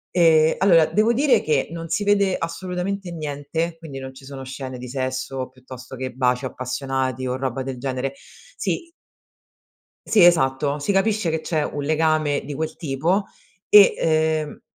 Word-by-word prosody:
Ehm, 160 Hz, -2 st, +5 dB
allora 170 Hz, -4 st, +5 dB
devo 215 Hz, +6 st, +2 dB
dire 270 Hz, +3 st, +3 dB
che 150 Hz, -3 st, 0 dB
non 165 Hz, 0 st, -6 dB
si 205 Hz, -, 0 dB
vede 200 Hz, -2 st, +2 dB
assolutamente 180 Hz, +2 st, -4 dB
niente, 160 Hz, +2 st, -3 dB
quindi 150 Hz, -5 st, -9 dB
non 130 Hz, 0 st, -7 dB
ci 135 Hz, 0 st, -14 dB
sono 135 Hz, -1 st, -8 dB
scene 130 Hz, -1 st, -7 dB
di 125 Hz, 0 st, -8 dB
sesso, 130 Hz, 0 st, -3 dB
piuttosto 130 Hz, 0 st, -11 dB
che 130 Hz, 0 st, -4 dB
baci 125 Hz, 0 st, 0 dB
appassionati 130 Hz, 0 st, -3 dB
o 125 Hz, 0 st, -1 dB
roba 130 Hz, 0 st, -3 dB
del 130 Hz, -1 st, -6 dB
genere. 130 Hz, 0 st, -3 dB, 0.4 s
Sì 335 Hz, -2 st, -3 dB, 1.2 s
sì 205 Hz, -6 st, +6 dB
esatto 145 Hz, -3 st, +3 dB
si 145 Hz, -, -1 dB
capisce 200 Hz, -2 st, +1 dB
che 160 Hz, -, -1 dB
c'è 155 Hz, -1 st, -1 dB
un 145 Hz, -, -4 dB
legame 155 Hz, -1 st, +1 dB
di 145 Hz, +1 st, -6 dB
quel 160 Hz, +1 st, -3 dB
tipo 165 Hz, +6 st, 0 dB, 0.5 s
e, 205 Hz, -2 st, +8 dB
ehm, 155 Hz, -1 st, 0 dB
150 Hz, 160 wpm, -22 LUFS, 130-170 Hz, 1.2 s, e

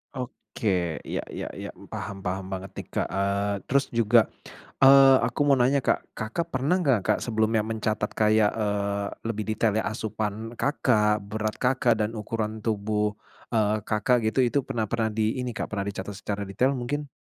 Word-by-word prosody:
Oke 95 Hz, -, -2 dB
ya -, -, -3 dB
ya -, -, -5 dB
ya -, -, -7 dB, 0.2 s
paham 100 Hz, -1 st, -6 dB
paham 95 Hz, +1 st, -2 dB
banget 95 Hz, 0 st, -6 dB
nih -, -, -6 dB
Kak, -, -, 0 dB
eee, 100 Hz, +1 st, 0 dB
terus 140 Hz, +1 st, +2 dB
juga, 115 Hz, 0 st, +5 dB, 0.7 s
eee, 135 Hz, 0 st, +9 dB
aku -, -, -3 dB
mau 140 Hz, -, +6 dB
nanya 130 Hz, +3 st, +3 dB
Kak, -, -, -1 dB
Kakak 135 Hz, +11 st, -3 dB
pernah 140 Hz, +8 st, +1 dB
gak 130 Hz, -6 st, +4 dB
Kak 105 Hz, -, +3 dB
sebelumnya 110 Hz, -1 st, +1 dB
mencatat 110 Hz, -1 st, -1 dB
kayak, 110 Hz, -1 st, +3 dB
eee, 100 Hz, -2 st, -1 dB, 0.2 s
lebih 110 Hz, -2 st, -2 dB
detail 110 Hz, 0 st, +1 dB
ya -, -, -5 dB
asupan 110 Hz, +1 st, -4 dB
Kakak, 105 Hz, -7 st, +2 dB
berat 110 Hz, +1 st, -3 dB
Kakak 125 Hz, -1 st, +2 dB
dan 110 Hz, -, -3 dB
ukuran 110 Hz, 0 st, -3 dB
tubuh, 105 Hz, -1 st, 0 dB, 0.3 s
eee, 110 Hz, -2 st, +1 dB
Kakak 115 Hz, +4 st, +1 dB
gitu 110 Hz, -, -3 dB
itu 140 Hz, -, +1 dB
pernah 115 Hz, -3 st, -2 dB
pernah 115 Hz, +1 st, 0 dB
di 110 Hz, +3 st, 0 dB
ini 125 Hz, -, -3 dB
Kak -, -, -2 dB
pernah 100 Hz, -2 st, -2 dB
dicatat 100 Hz, 0 st, -5 dB
secara 100 Hz, 0 st, -4 dB
detail 130 Hz, +8 st, +1 dB
mungkin? 145 Hz, +4 st, -3 dB
110 Hz, 170 wpm, -26 LUFS, 105-120 Hz, 0.7 s, eee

